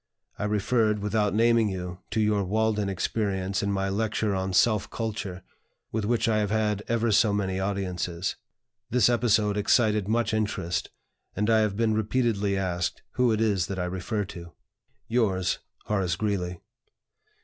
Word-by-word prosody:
I - - -1
referred 105 +1 +1
(without 105 -1 0
naming 115 -1 +4
you) 90 -1 -5
to - - -1
your 105 -1 +2
'Walden' 105 +1 0
experience 95 0 -1
in 100 - 0
my 95 0 0
lecture 105 +1 0
on 95 0 -1
'Self 105 +2 +3
Culture,' 100 -5 -4 0.5
with 110 -2 -1
which 115 +2 +1
I 110 -1 +2
have 105 -1 0
had 105 -1 0
ever 115 0 +1
so 105 +1 +4
many 95 -2 -1
audiences. 95 -2 -2 0.5
This 120 -2 +4
episode 110 -4 +2
excited 105 -1 +2
much 115 0 +1
interest, 105 -5 -1 0.5
and 105 +2 +1
I 110 - +5
have 105 -2 0
been 115 -1 +2
repeatedly 110 -2 +1
asked 90 -3 -2
who 125 -2 +2
it 110 - +1
is 100 -6 +1
that 100 - -4
I 90 - -1
refer 95 +4 -2
to. 85 -3 -10 0.5
"Yours, 100 -7 +1 0.3
"HORACE 95 -5 0
GREELEY. 90 -3 -2
105 Hz, 155 wpm, -27 LUFS, 95-110 Hz, 0.5 s, I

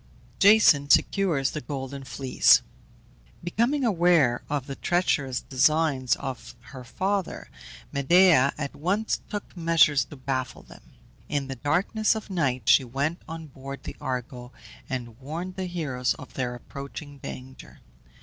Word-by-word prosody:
JASON 195 -9 +6
SECURES 160 -6 +2
THE 150 - -5
GOLDEN 135 -1 -6
FLEECE. 130 +2 +3 0.8
Becoming 235 +11 0
aware 170 - +3
of 145 -3 -2
the 135 - -6
treacherous 140 -8 0
designs 140 -2 +2
of 135 -3 -7 0.2
her 130 -2 -8
father, 190 +8 -3 0.4
Medea 145 -1 +5
at 140 -2 -5
once 200 +8 -1
took 205 -2 -6
measures 160 -6 +3
to - - -12
baffle 130 -1 -4
them. - - -17 0.4
In 140 -2 -2
the 135 - -4
darkness 185 - +1
of 215 -2 -7
night 130 - -1
she - - +6
went 140 +7 -2
on 165 0 -7
board 135 -1 -9
the - - -7
Argo, 125 -1 -5 0.4
and 120 -3 -5
warned 165 +7 -6
the 190 -1 -4
heroes 140 -8 -2
of - - -12
their 125 -2 -3
approaching 140 +2 -9
danger. 130 0 -10
140 Hz, 135 wpm, -26 LUFS, 130-175 Hz, 0.8 s, JASON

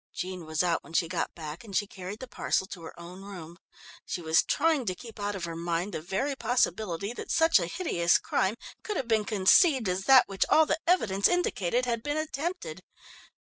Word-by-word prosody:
Jean 180 -2 -5
was 155 +2 0
out 170 -2 0
when 165 - -14
she 165 0 +2
got 175 +1 -3
back 155 +3 -7
and 200 -4 -3
she 205 - +1
carried 195 0 -8
the 260 - -8
parcel 190 - -1
to 190 -2 -9
her 165 - -10
own 180 +2 -10
room. 175 -4 -10 0.4
She - - -4
was 160 -1 +3
trying 300 -5 +1
to 185 - -1
keep 225 +2 -12
out 205 0 -2
of 190 - -6
her 165 -1 -4
mind 170 +3 -2
the 155 - -3
very 195 - -2
possibility 215 -5 -1
that - - -8
such 325 0 +4
a - - -2
hideous 180 - +2
crime 190 +3 0 0.3
could 420 -3 -4
have 260 - -3
been 220 -2 +2
conceived 225 - +4
as 185 +1 -1
that 265 -1 +7
which 195 -1 0
all 315 - +6
the 310 - 0
evidence 205 - +3
indicated 250 - 0
had 235 -2 -1
been 290 +4 -2
attempted. 330 - -4
200 Hz, 210 wpm, -28 LUFS, 175-260 Hz, 0.4 s, that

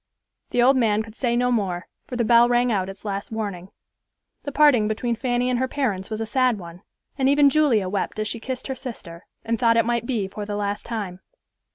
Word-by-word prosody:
The 240 - +2
old 265 +2 +5
man 220 -3 +2
could 220 -1 -12
say 240 0 -1
no 250 +1 +2
more, 190 -6 -1 0.2
for 250 - -6
the 240 -1 0
bell 235 +1 +6
rang 245 0 +2
out 190 -3 0
its 195 +2 -11
last 200 0 -4
warning. 200 -5 -4 0.7
The 285 - -5
parting 280 -7 +4
between 230 +2 -1
Fanny 245 +1 0
and 250 -1 +1
her 260 - +1
parents 220 -9 -2
was 215 -1 -4
a 225 - -2
sad 250 +1 +1
one, 175 -1 -10 0.4
and 265 0 +3
even 285 0 +5
Julia 265 -11 +3
wept 200 +2 -2
as 215 0 -1
she 230 - -3
kissed 255 +2 -5
her 265 - -3
sister, 225 -10 -9 0.2
and 230 0 -1
thought 230 -1 +4
it 230 - +3
might 235 0 -1
be 220 -7 -1
for 205 +2 -7
the 205 0 -4
last 205 0 -3
time. 205 -6 -4
230 Hz, 225 wpm, -23 LUFS, 205-250 Hz, 0.7 s, bell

